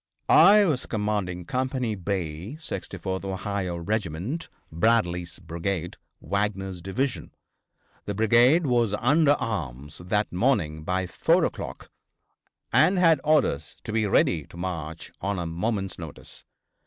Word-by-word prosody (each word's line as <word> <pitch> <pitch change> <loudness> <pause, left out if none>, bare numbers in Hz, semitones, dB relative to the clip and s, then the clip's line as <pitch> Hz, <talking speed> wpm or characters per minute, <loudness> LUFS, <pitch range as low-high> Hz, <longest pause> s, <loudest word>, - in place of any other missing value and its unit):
I 205 +4 +8
was 145 -8 -1
commanding 105 -5 -2
Company 130 +1 -1
B, 95 - -4
64th 95 - -5
Ohio 95 -1 -3
Regiment, 100 - -3 0.2
Bradley's 90 -2 +1
brigade, 85 +1 -4 0.2
Wagner's 95 -2 -2
division. 125 +9 -3 0.7
The 100 - -3
brigade 120 - +4
was 120 -5 +2
under 145 +5 +4
arms 75 - -4
that 105 +4 -1
morning 90 - +1
by 90 +3 -1
4 90 - +2
o'clock, - - -6 0.8
and 190 - +5
had 165 -5 +4
orders 135 - +1
to 110 - -5
be 110 -2 +1
ready 80 -5 +2
to - - -13
march 85 -3 -5
on 100 +1 -1
a 85 - -3
moment's 95 +3 -2
notice. 80 -4 -9
100 Hz, 120 wpm, -26 LUFS, 85-120 Hz, 0.8 s, I